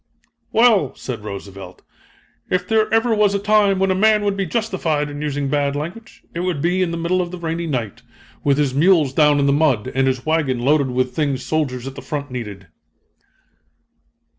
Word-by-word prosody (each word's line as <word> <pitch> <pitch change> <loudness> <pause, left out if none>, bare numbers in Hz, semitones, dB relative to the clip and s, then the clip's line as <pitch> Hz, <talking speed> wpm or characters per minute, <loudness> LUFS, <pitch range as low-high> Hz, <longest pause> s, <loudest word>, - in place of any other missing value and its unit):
"Well," 220 - +3
said 120 -5 -6
Roosevelt, 100 -3 -9 0.7
"if 180 0 -1
there 220 -1 +1
ever 225 +1 +2
was 210 -2 +2
a - - +3
time 205 -1 +3
when 190 0 +1
a - - +3
man 210 +2 +3
would 200 -1 0
be 195 -2 -2
justified 165 -8 -1
in 145 0 -7
using 145 -2 -2
bad 140 0 0
language, 170 +10 -7
it 170 - -4
would 180 -4 -1
be 175 +5 +1
in 180 - +1
the 170 - -3
middle 175 +2 0
of 175 -1 -4
a 180 - -6
rainy 170 0 -3
night, 120 -9 -3 0.4
with 140 -1 +2
his 145 -3 +1
mules 155 -2 +3
down 150 0 +4
in 140 - +2
the 140 - +3
mud 140 -8 +1
and 135 0 +1
his 130 -2 -1
wagon 155 -5 +1
loaded 140 +2 +2
with 125 0 -1
things 140 -4 -1
soldiers 135 -6 -2
at 135 - -6
the 140 - -9
front 145 -2 -5
needed." 105 -6 -6
150 Hz, 195 wpm, -20 LUFS, 135-185 Hz, 0.7 s, down